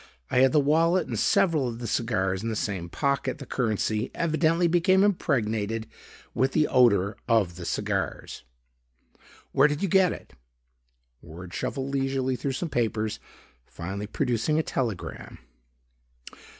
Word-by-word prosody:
I 125 - +3
had 130 0 +5
the 150 - +4
wallet 165 +4 +3
and - - -3
several 160 -8 +2
of 115 -1 -5
the 120 - -7
cigars 105 -5 -1
in 115 - -3
the 110 - -2
same 95 -5 -3
pocket. 140 +3 -1
The 140 - -9
currency 110 -3 -1
evidently 165 +1 +2
became 185 +3 +3
impregnated 115 - 0 0.5
with 130 +1 +1
the 155 - +3
odor 105 -7 +3
of 105 -7 +2
the 90 -1 -8
cigars. - - -3 1.1
Where 140 +2 +5
did 150 +4 -3
you - - +2
get 190 -1 +4
it?" - - -9 0.9
Ward 85 +2 -11
shuffled 135 0 -3
leisurely 135 -1 0
through 135 +3 -3
some 165 +5 -3
papers, 110 -3 -1 0.5
finally 95 +4 -6
producing 125 +5 0
a 160 - +2
telegram. 115 - -4
125 Hz, 140 wpm, -26 LUFS, 110-150 Hz, 1.1 s, had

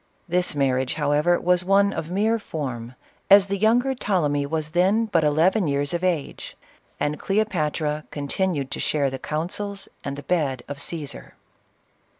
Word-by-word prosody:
This 180 -2 +1
marriage, 130 -2 +1
however, 150 +3 +2
was 180 0 +2
one 200 +2 +3
of 160 - -4
mere 215 +5 +1
form, 130 - -5 0.3
as 200 0 +8
the 200 0 -2
younger 240 +5 +3
Ptole 190 - 0
my 145 -1 -1
was 155 0 -2
then 190 +7 +3
but 175 -7 +1
eleven 165 +6 +3
years 140 +1 0
of 175 +1 -2
age; 170 -6 -2 0.4
and 150 +1 -1
Cleopatra 155 -7 -1
continued 145 0 -2
to - - -4
share 140 -3 0
the 135 - -5
counsels 195 +8 -4 0.2
and 140 0 -4
the 145 - -7
bed 140 -7 -1
of 140 0 -6
Caesar. 155 -4 -5
160 Hz, 155 wpm, -24 LUFS, 145-195 Hz, 0.4 s, as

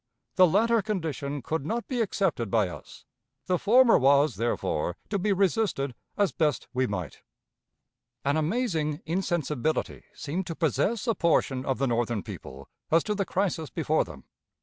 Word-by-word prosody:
The 185 -1 +7
latter 225 +6 +3
condition 155 - -3
could 160 0 -2
not 230 +10 -3
be 250 -3 -1
accepted 185 - 0
by 105 -4 +2
us. - - -11 0.4
The 180 -2 +1
former 240 +3 +5
was, 140 +2 +4
therefore, 95 -7 -1
to 200 - 0
be 205 +3 +1
resisted 195 - +1 0.2
as 205 -2 +2
best 150 -6 0
we 130 0 +1
might. 90 -8 -5 1.0
An 140 +1 +2
amazing 160 -3 -1
insensibility 155 -4 -1
seemed 170 +6 -4
to 165 - -4
possess 190 - 0
a 230 - +2
portion 155 -8 +1
of 135 - 0
the 135 - +1
Northern 120 -3 0
people 70 +1 -9 0.2
as 165 +1 +4
to 210 - -1
the 200 -1 -1
crisis 180 -6 -1
before 155 -1 +1
them. - - -12
160 Hz, 155 wpm, -27 LUFS, 135-200 Hz, 1.0 s, The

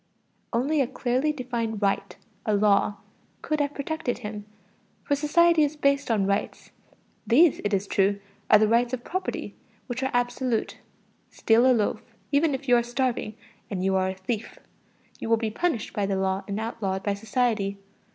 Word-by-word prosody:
Only 275 +6 +1
a 260 - +1
clearly 260 +3 0
defined 240 -6 -3
right, 200 -1 -1 0.3
a 215 - +1
law, 205 0 +3 0.5
could 305 0 -1
have 290 0 -1
protected 280 -3 -3
him, 210 -3 -7 0.6
for 285 - +1
society 325 +3 +4
is 300 0 +1
based 280 -2 +1
on 210 -4 +2
rights. 200 +2 -2 0.6
These, 290 +8 +5
it 205 - -1
is 200 0 0
true, 200 0 +1 0.3
are - - +8
the 215 +1 +3
rights 235 +2 +2
of 240 - -13
property, 370 +1 -4 0.3
which 245 0 -4
are 265 - 0
absolute; 245 -1 -1 0.5
steal 235 +3 +3
a - - +6
loaf, 225 -4 +1 0.3
even 290 0 +3
if 275 +1 -8
you 245 - +6
are - - +3
starving, 240 -3 -2 0.3
and 190 -4 -3
you 190 0 +2
are 190 0 +1
a 190 - -4
thief. 205 +4 -4 0.6
You - - -5
will 230 - +4
be 220 -1 -2
punished 300 -3 -1
by 205 -2 -1
the 195 -1 0
law 190 0 0
and 200 +1 -3
outlawed 200 -4 -3
by 205 - 0
society. 215 -2 -1
235 Hz, 175 wpm, -26 LUFS, 205-270 Hz, 0.6 s, are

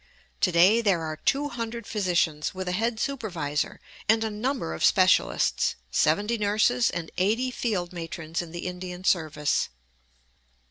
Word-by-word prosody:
To 180 - +2
day 185 +7 +5
there 190 -7 +2
are 155 -1 -3
two 285 - 0
hundred 235 -2 -5
physicians, 175 -7 0
with 185 0 -5
a - - 0
head 225 +4 -1
supervisor 175 - -2 0.3
and 220 0 +4
a 220 - -2
number 220 - -2
of 80 - -4
specialists, - - +3 0.2
seventy 205 - +2
nurses, 215 +4 +2
and 165 -1 -5
eighty 225 +7 +1
field 195 -8 -2
matrons 165 -1 -4
in 170 - -8
the 170 +1 -7
Indian 180 0 -6
service. 155 -5 +1
185 Hz, 145 wpm, -26 LUFS, 170-225 Hz, 0.3 s, day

